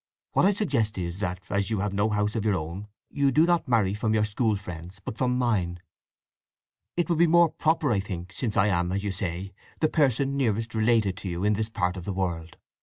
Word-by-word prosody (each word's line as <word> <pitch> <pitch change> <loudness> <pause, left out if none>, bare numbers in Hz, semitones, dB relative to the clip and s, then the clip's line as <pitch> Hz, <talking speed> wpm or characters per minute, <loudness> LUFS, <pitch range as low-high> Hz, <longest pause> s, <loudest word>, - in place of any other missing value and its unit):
What - - +4
I - - +5
suggest 135 - 0
is 90 0 -4
that, 90 -2 -3
as 100 -1 -1
you 110 -4 -1
have 105 -1 -2
no 100 +2 +1
house 105 0 0
of 110 - -1
your 105 -3 +2
own, 85 +5 -5 0.2
you 140 -1 +2
do 155 +5 +5
not 175 -1 +1
marry 110 -6 +2
from 110 +1 0
your 105 -1 +3
school 105 +1 0
friend's, 90 -1 -8
but 105 - -6
from 125 +1 0
mine. 95 -9 0 1.2
It 175 - +1
would 170 -2 0
be 170 - +6
more 170 0 +5
proper, 160 -3 +1
I 100 - +2
think, 95 -2 -6
since 110 -2 -3
I 95 - +5
am, 90 -3 +1
as 100 +1 -1
you 100 - -1
say, 95 0 -4 0.3
the 155 - +2
person 140 -2 +2
nearest 115 -4 0
related 110 -3 +2
to 95 - -5
you 85 +1 -3
in 105 +1 +3
this 110 +2 -1
part 95 -4 -1
of 90 - -7
the 100 - -2
world. 85 -3 -3
105 Hz, 230 wpm, -26 LUFS, 95-125 Hz, 1.2 s, be